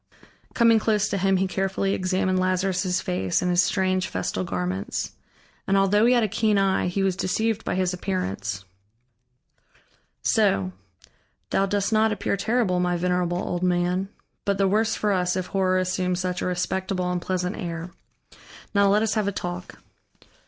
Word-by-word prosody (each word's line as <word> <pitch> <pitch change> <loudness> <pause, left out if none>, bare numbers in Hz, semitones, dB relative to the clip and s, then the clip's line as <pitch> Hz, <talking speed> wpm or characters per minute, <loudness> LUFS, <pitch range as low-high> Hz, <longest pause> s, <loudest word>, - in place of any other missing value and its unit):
Coming 230 -2 +5
close 210 -1 +1
to 200 - -1
him, 195 0 +3
he 190 - +1
carefully 195 +1 -1
examined 185 0 0
Lazarus' 185 0 0
face 95 - -1
and 180 - +1
his 175 0 +4
strange 185 0 +1
festal 95 0 -2
garments. 90 +1 -3 0.6
And 195 - +3
although 205 +3 +4
he 250 - +5
had 240 - +3
a - - +2
keen 215 +1 +1
eye, 195 -2 +2
he 195 +2 -1
was 190 -2 +1
deceived 220 +4 -1
by - - -2
his 185 -1 0
appearance. 105 - -3 1.6
"So. 95 -1 +2 0.8
Thou 195 - +2
dost 200 +2 0
not 220 0 +3
appear 205 -1 -1
terrible, 210 -2 +1
my 180 0 +1
venerable 180 0 0
old 175 -1 -3
man. 180 +1 +1 0.3
But 200 -1 0
the 195 0 +3
worse 220 +3 +2
for 210 - 0
us, 180 -2 +1
if 185 -1 -2
horror 185 -1 +2
assumes 185 -1 0
such 180 -1 -2
a - - -1
respectable 180 0 -1
and 180 -1 -2
pleasant 180 +2 -2
air. 170 -2 -5 0.8
Now 200 -1 +4
let 210 +2 +3
us 220 - +1
have 215 -2 0
a - - +1
talk." 180 -1 -6
185 Hz, 165 wpm, -24 LUFS, 180-200 Hz, 1.6 s, Coming